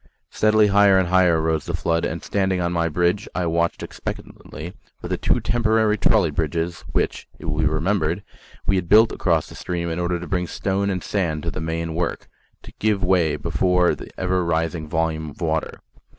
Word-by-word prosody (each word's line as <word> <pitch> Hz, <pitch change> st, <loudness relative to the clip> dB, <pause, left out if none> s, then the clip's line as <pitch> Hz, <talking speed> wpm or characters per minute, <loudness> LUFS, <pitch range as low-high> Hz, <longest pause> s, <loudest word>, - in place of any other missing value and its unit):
Steadily 110 Hz, 0 st, +4 dB
higher 100 Hz, -1 st, +5 dB
and 95 Hz, -2 st, +1 dB
higher 90 Hz, -3 st, +4 dB
rose 80 Hz, -1 st, 0 dB
the -, -, -2 dB
flood, 85 Hz, -1 st, 0 dB
and 80 Hz, +1 st, -4 dB
standing 95 Hz, -2 st, 0 dB
on 85 Hz, 0 st, -1 dB
my 85 Hz, -1 st, +1 dB
bridge, 90 Hz, +5 st, 0 dB
I 90 Hz, -, 0 dB
watched 85 Hz, 0 st, 0 dB
expectantly 80 Hz, +4 st, -7 dB, 0.3 s
for -, -, -7 dB
the -, -, -1 dB
two -, -, +1 dB
temporary 110 Hz, -2 st, +2 dB
trolley 105 Hz, -7 st, +3 dB
bridges 80 Hz, +3 st, -2 dB
which, -, -, -1 dB
it -, -, -11 dB
will 75 Hz, +1 st, -2 dB
be 80 Hz, -, +3 dB
remembered, 85 Hz, +3 st, 0 dB, 0.4 s
we 95 Hz, -, +2 dB
had 90 Hz, -2 st, -3 dB
built 110 Hz, +2 st, +6 dB
across 85 Hz, -5 st, 0 dB
the -, -, -12 dB
stream 85 Hz, -1 st, -3 dB
in 80 Hz, -, -3 dB
order 90 Hz, 0 st, -1 dB
to 90 Hz, -, -6 dB
bring 90 Hz, -2 st, -1 dB
stone 100 Hz, +3 st, -1 dB
and 95 Hz, -2 st, -2 dB
sand 80 Hz, -7 st, -1 dB
to -, -, -2 dB
the -, -, -5 dB
main 80 Hz, 0 st, -3 dB
work 85 Hz, +1 st, -3 dB, 0.4 s
to -, -, -13 dB
give 105 Hz, -2 st, +1 dB
way 90 Hz, -5 st, +2 dB
before 90 Hz, +4 st, +2 dB
the -, -, -9 dB
ever 90 Hz, -1 st, +1 dB
rising 80 Hz, -1 st, -1 dB
volume 80 Hz, -1 st, -1 dB
of 70 Hz, -, -14 dB
water. 80 Hz, -2 st, -2 dB
85 Hz, 195 wpm, -22 LUFS, 80-95 Hz, 0.4 s, built